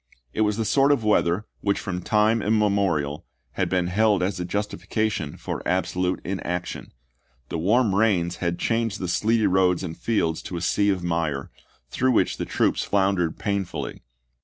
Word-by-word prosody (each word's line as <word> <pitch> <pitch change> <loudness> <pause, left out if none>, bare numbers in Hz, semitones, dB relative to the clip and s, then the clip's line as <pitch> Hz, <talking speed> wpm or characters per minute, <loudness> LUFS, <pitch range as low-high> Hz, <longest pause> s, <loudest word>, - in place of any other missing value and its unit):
It - - -1
was 105 -1 +2
the 110 - -1
sort 140 +5 +4
of 140 -6 +2
weather 105 -2 +2
which 100 -1 0
from 90 -3 -4
time 110 +3 +2
immemorial 100 -9 +1 0.3
had - - -1
been 90 -2 +1
held 100 +1 +2
as 90 0 -1
a 90 - -2
justifica 105 +2 -1
tion 75 -7 -5
for - - -5
absolute 90 0 0
inaction. 90 -1 -4 0.6
The 85 - -3
warm 105 +5 +3
rains 95 -5 +2
had 85 -1 -1
changed 115 -2 0
the 90 - -3
sleety 110 +5 +2
roads 90 -1 +3
and 80 -3 -5
fields 85 -8 0
to 90 - -6
a - - -4
sea 100 +2 +2
of 95 -3 0
mire, 80 -5 -2 0.4
through 130 0 +2
which - - +2
the - - -3
troops - - +1
floundered 95 -4 +1
pain 100 -1 -1
fully. 90 - -6
95 Hz, 175 wpm, -24 LUFS, 90-110 Hz, 0.6 s, sort